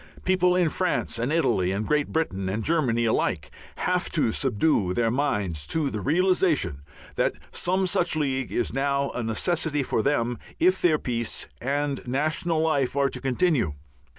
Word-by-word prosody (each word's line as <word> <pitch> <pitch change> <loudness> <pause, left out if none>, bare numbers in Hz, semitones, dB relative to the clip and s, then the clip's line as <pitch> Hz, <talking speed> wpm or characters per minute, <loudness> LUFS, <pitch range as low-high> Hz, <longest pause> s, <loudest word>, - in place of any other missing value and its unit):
People 180 -1 +3
in 180 -2 +3
France 175 -7 -1
and 120 +5 -1
Italy 115 - +2
and 100 +3 -2
Great 150 -1 +1
Britain 95 -13 -2
and 105 +3 -2
Germany 125 -7 +1
alike 90 -8 0 0.3
have 180 0 0
to 150 -8 +2
subdue 110 - +1
their 115 -1 +2
minds 105 - -1
to 155 -4 0
the 105 - -4
realization 160 - +1 0.4
that - - +2 0.2
some 185 +2 0
such 175 -2 0
League 135 -4 -1
is 120 - -1
now 140 +1 0
a 125 - -4
necessity 150 +6 -1
for 115 - 0
them 120 -3 0 0.2
if 185 +2 +3
their 165 -3 +4
peace 120 -4 -3
and 140 +2 -1
national 155 +5 0
life 140 -5 +1
are 140 -1 +2
to 130 - -5
continue. 135 - +1
140 Hz, 160 wpm, -25 LUFS, 115-160 Hz, 0.4 s, their